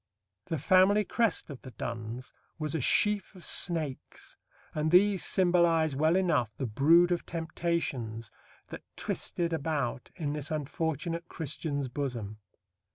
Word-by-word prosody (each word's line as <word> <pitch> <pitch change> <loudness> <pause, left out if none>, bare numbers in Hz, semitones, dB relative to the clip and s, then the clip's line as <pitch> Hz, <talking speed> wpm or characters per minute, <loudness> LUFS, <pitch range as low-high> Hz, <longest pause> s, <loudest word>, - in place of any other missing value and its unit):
The 160 - -1
family 190 +6 +4
crest 230 -8 0
of 135 - -9
the 130 - -9
Donnes 115 +1 -6 0.2
was 155 -3 -2
a 160 - -1
sheaf 210 - +2
of 180 - -10
snakes, 160 -7 -1 0.4
and 155 0 0
these 190 +2 +4
symbolize 170 -5 +3
well 155 +4 +3
enough 145 - +1
the 135 - -2
brood 160 +10 +4
of 175 - 0
temptations 160 -9 -3 0.4
that - - -8
twisted 170 -1 -2
about 145 -6 -2
in 150 -5 -3
this 150 -1 -3
unfortunate 160 +3 -3
Christian's 145 -3 -3
bosom. 120 -6 -4
160 Hz, 130 wpm, -30 LUFS, 135-175 Hz, 0.4 s, family